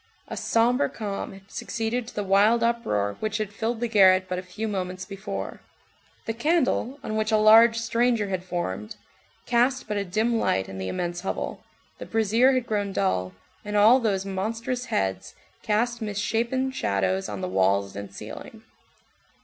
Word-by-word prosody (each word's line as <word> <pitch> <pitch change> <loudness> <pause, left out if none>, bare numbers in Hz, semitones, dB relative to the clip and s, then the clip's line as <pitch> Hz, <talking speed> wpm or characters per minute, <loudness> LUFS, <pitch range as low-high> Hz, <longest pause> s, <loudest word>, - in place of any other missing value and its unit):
A - - -6
sombre 245 +4 +2
calm 205 -3 -5
had 195 0 -16
succeeded 230 +1 -3
to - - -11
the 205 - -1
wild 205 +4 +4
uproar 105 - 0
which 215 -1 -2
had 215 -2 -4
filled 225 +1 -2
the 240 - +1
garret 190 -4 +5
but 180 0 -2
a - - -4
few 190 +5 -5
moments 185 -2 -4
before. 195 +1 -6 0.6
The 225 - -2
candle, 275 -1 +1
on 215 - -3
which 215 +1 0
a 215 - +4
large 225 +2 +7
"stranger" 230 -2 +1
had 185 -2 -2
formed, 105 - -4 0.5
cast 250 +2 +1
but 210 -1 -2
a 200 - 0
dim 220 +5 0
light 95 - 0
in 95 - -8
the 95 - -3
immense 175 - -3
hovel, 190 - -4 0.4
the - - -7
brazier 225 +4 +3
had 255 -2 0
grown 205 -3 -2
dull, 95 - 0 0.3
and 210 0 -2
all 220 +5 +7
those 200 -5 0
monstrous 225 +6 -3
heads 95 - -2 0.3
cast 235 +3 0
misshapen 230 +5 -1
shadows 95 - -1
on 100 -2 -5
the 90 - -2
walls 95 +1 +1
and 100 -1 -7
ceiling. - - -10
210 Hz, 170 wpm, -25 LUFS, 185-230 Hz, 0.6 s, large